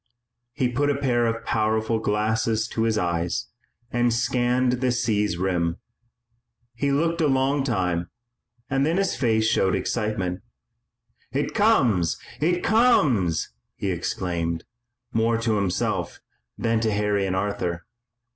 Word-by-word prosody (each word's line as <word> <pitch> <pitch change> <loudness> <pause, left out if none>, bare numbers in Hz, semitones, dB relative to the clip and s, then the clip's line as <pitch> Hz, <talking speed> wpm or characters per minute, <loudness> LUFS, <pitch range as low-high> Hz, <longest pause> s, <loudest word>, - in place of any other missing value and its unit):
He 130 -2 +1
put 140 +4 0
a 145 - +2
pair 120 -4 +1
of 115 0 -3
powerful 110 +1 +1
glasses 110 +1 0
to 115 - -1
his 110 -1 +1
eyes 85 -3 -1 0.4
and 120 0 +2
scanned 125 +1 +1
the 130 -1 +2
sea's 105 -6 0
rim. 85 -2 0 1.0
He 140 +4 -1
looked 165 +4 +1
a 155 - +3
long 135 +1 +2
time, 90 -8 -1 0.6
and 135 0 +1
then 160 +5 +1
his 195 -1 +1
face 110 -4 +1
showed 95 -3 +2
excitement. 100 -5 -2 0.9
"It 140 +4 -1
comes! 125 - +3 0.2
It 175 +3 +1
comes!" 135 - +3 0.2
he 100 - -2
exclaimed, 85 -1 -2 0.5
more 115 +1 +2
to 115 -2 0
himself 100 -3 -1 0.4
than 115 -1 +1
to 110 -1 0
Harry 105 -1 +1
and 95 - -1
Arthur. 90 -3 -2
115 Hz, 130 wpm, -24 LUFS, 95-130 Hz, 1.0 s, a